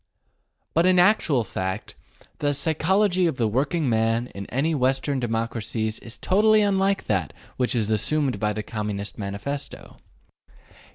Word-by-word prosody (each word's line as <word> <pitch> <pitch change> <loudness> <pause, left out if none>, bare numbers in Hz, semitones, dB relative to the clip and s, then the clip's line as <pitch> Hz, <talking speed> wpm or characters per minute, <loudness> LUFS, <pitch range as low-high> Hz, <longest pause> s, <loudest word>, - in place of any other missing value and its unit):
But 165 +3 +3
in 185 0 +4
actual 175 - +4
fact 95 0 -4 0.5
the 145 -1 +1
psychology 180 +5 +2
of 160 - -1
the 115 - +1
working 140 +7 0
man 115 +1 +1
in 100 0 -7
any 140 +7 0
of 155 - 0
the - - -7
Western 135 +2 +1
democracies 115 -2 -2
is 115 - -8
totally 215 +3 +3
unlike 195 -1 +1
that 95 -8 -1 0.2
which 125 0 0
is 110 -2 0
assumed 135 +6 +1
in 105 0 +1
the 110 - -3
Communist 105 -1 -5
Manifesto. 105 +8 -6
130 Hz, 150 wpm, -24 LUFS, 110-165 Hz, 0.5 s, in